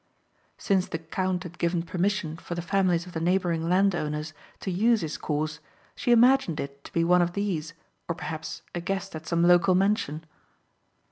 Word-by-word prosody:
Since 190 Hz, -3 st, +1 dB
the 165 Hz, -, -3 dB
count 180 Hz, +2 st, -2 dB
had 175 Hz, -1 st, -10 dB
given 170 Hz, 0 st, 0 dB
permission 185 Hz, -1 st, -1 dB
for 175 Hz, +1 st, -6 dB
the 175 Hz, -, -4 dB
families 180 Hz, -2 st, +1 dB
of 180 Hz, -, -10 dB
the 160 Hz, -, -2 dB
neighbouring 170 Hz, -1 st, +1 dB
landowners 160 Hz, -5 st, +1 dB, 0.3 s
to 190 Hz, -, -3 dB
use 220 Hz, +4 st, +3 dB
his 155 Hz, -2 st, -3 dB
course 150 Hz, 0 st, -2 dB, 0.4 s
she 245 Hz, -, 0 dB
imagined 240 Hz, -, +5 dB
it 140 Hz, 0 st, -6 dB
to -, -, -10 dB
be 165 Hz, -, +1 dB
one 180 Hz, +1 st, +4 dB
of 175 Hz, 0 st, 0 dB
these 170 Hz, -5 st, -2 dB, 0.3 s
or 170 Hz, -, -2 dB
perhaps 160 Hz, -2 st, -6 dB
a 175 Hz, -, -3 dB
guest 195 Hz, 0 st, -3 dB
at 160 Hz, +1 st, -8 dB
some 170 Hz, 0 st, +1 dB
local 180 Hz, +2 st, +5 dB
mansion. 185 Hz, -5 st, +1 dB
175 Hz, 180 wpm, -27 LUFS, 160-190 Hz, 0.4 s, imagined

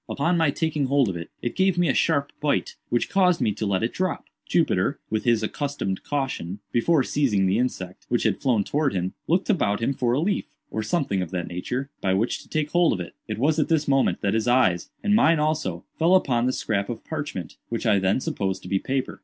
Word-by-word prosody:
Upon 170 Hz, +5 st, +1 dB
my 165 Hz, -3 st, +3 dB
taking 150 Hz, -1 st, 0 dB
hold 135 Hz, -3 st, +3 dB
of 90 Hz, -, -3 dB
it, 85 Hz, 0 st, -6 dB
it 120 Hz, -, -2 dB
gave 190 Hz, -2 st, +2 dB
me 175 Hz, -1 st, +3 dB
a 135 Hz, -, +2 dB
sharp 145 Hz, -4 st, +1 dB
bite, 145 Hz, -1 st, 0 dB
which 120 Hz, -, +1 dB
caused 180 Hz, -3 st, +3 dB
me 105 Hz, -, +2 dB
to 105 Hz, +1 st, -3 dB
let 95 Hz, +1 st, 0 dB
it 115 Hz, -, -1 dB
drop. 185 Hz, -2 st, -2 dB, 0.2 s
Jupiter, -, -, +1 dB
with 110 Hz, -1 st, -1 dB
his 115 Hz, -2 st, +3 dB
accustomed 135 Hz, -6 st, -3 dB
caution, 130 Hz, -10 st, -3 dB
before 140 Hz, +5 st, +3 dB
seizing 120 Hz, -9 st, +1 dB
the 95 Hz, +4 st, +2 dB
insect, 95 Hz, -7 st, -3 dB
which 120 Hz, -, +1 dB
had -, -, 0 dB
flown 120 Hz, -6 st, +2 dB
towards 145 Hz, +1 st, 0 dB
him, 90 Hz, 0 st, -2 dB
looked 180 Hz, +4 st, +1 dB
about 145 Hz, -, +1 dB
him 115 Hz, +4 st, 0 dB
for 125 Hz, -3 st, 0 dB
a 130 Hz, -, +2 dB
leaf, 195 Hz, +6 st, 0 dB, 0.3 s
or 110 Hz, -, -2 dB
something 110 Hz, -, 0 dB
of 90 Hz, -, -4 dB
that 90 Hz, -1 st, -3 dB
nature, 125 Hz, +10 st, -4 dB
by 95 Hz, -1 st, +1 dB
which 110 Hz, +5 st, 0 dB
to -, -, -19 dB
take 155 Hz, -1 st, -1 dB
hold 175 Hz, -1 st, +4 dB
of 95 Hz, -, -3 dB
it. 90 Hz, -, -6 dB
It -, -, -3 dB
was 150 Hz, +6 st, +2 dB
at 155 Hz, -, +2 dB
this 160 Hz, -2 st, +2 dB
moment 135 Hz, -1 st, +2 dB
that 100 Hz, -1 st, +1 dB
his 110 Hz, +1 st, 0 dB
eyes, 120 Hz, -9 st, +3 dB
and 205 Hz, -1 st, +2 dB
mine 165 Hz, -6 st, +5 dB
also, 150 Hz, -, -1 dB
fell 170 Hz, +3 st, +5 dB
upon 125 Hz, -9 st, +2 dB
the 130 Hz, -, +1 dB
scrap 100 Hz, -5 st, -1 dB
of 120 Hz, -, -6 dB
parchment, 145 Hz, -, -5 dB
which 115 Hz, +1 st, -3 dB
I 105 Hz, -3 st, +4 dB
then 95 Hz, +5 st, +2 dB
supposed 95 Hz, -6 st, -2 dB
to -, -, -8 dB
be 95 Hz, -, +1 dB
paper. 130 Hz, +3 st, -3 dB
130 Hz, 235 wpm, -24 LUFS, 100-155 Hz, 0.3 s, mine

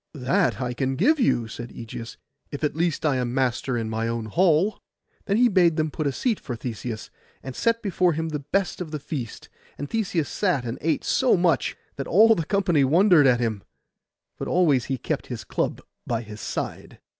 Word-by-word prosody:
'That 150 Hz, +8 st, +1 dB
I 125 Hz, -2 st, -2 dB
can 130 Hz, +1 st, -1 dB
give 290 Hz, -, +3 dB
you,' 120 Hz, -, +2 dB
said 120 Hz, +2 st, -7 dB
Ægeus, 115 Hz, 0 st, -8 dB, 0.3 s
'if 145 Hz, -, -7 dB
at 150 Hz, -, 0 dB
least 165 Hz, -1 st, 0 dB
I 145 Hz, -4 st, +2 dB
am 125 Hz, -1 st, -2 dB
master 130 Hz, -1 st, 0 dB
in 115 Hz, -1 st, -2 dB
my 110 Hz, +1 st, -2 dB
own 115 Hz, -1 st, -2 dB
hall.' 175 Hz, -, +2 dB, 0.4 s
Then 200 Hz, -, +1 dB
he 245 Hz, +1 st, +5 dB
bade 180 Hz, -6 st, +3 dB
them 155 Hz, -1 st, 0 dB
put 155 Hz, 0 st, -2 dB
a -, -, +1 dB
seat 225 Hz, -, -1 dB
for 125 Hz, -, -5 dB
Theseus, 115 Hz, -1 st, -6 dB, 0.3 s
and 130 Hz, -1 st, -7 dB
set 230 Hz, 0 st, +1 dB
before 180 Hz, -3 st, +2 dB
him 160 Hz, +1 st, -2 dB
the 150 Hz, -2 st, -3 dB
best 185 Hz, +7 st, -1 dB
of 170 Hz, -, -4 dB
the 150 Hz, -, -3 dB
feast; 140 Hz, -5 st, -6 dB, 0.3 s
and 145 Hz, -, -5 dB
Theseus 180 Hz, -6 st, -1 dB
sat 175 Hz, -11 st, 0 dB
and 115 Hz, 0 st, -4 dB
ate 160 Hz, -, 0 dB
so 260 Hz, -6 st, +3 dB
much, 175 Hz, -2 st, +1 dB, 0.2 s
that 135 Hz, -, -4 dB
all 220 Hz, +6 st, +6 dB
the 165 Hz, -7 st, -2 dB
company 180 Hz, -7 st, +2 dB
wondered 165 Hz, +1 st, +5 dB
at 125 Hz, -2 st, +4 dB
him: 110 Hz, -4 st, -1 dB, 0.8 s
but -, -, -4 dB
always 150 Hz, -9 st, +3 dB
he 135 Hz, -, -2 dB
kept -, -, -3 dB
his -, -, -6 dB
club -, -, -2 dB, 0.3 s
by 115 Hz, -1 st, -1 dB
his 105 Hz, -1 st, -10 dB
side. -, -, -5 dB
150 Hz, 200 wpm, -24 LUFS, 125-180 Hz, 0.8 s, all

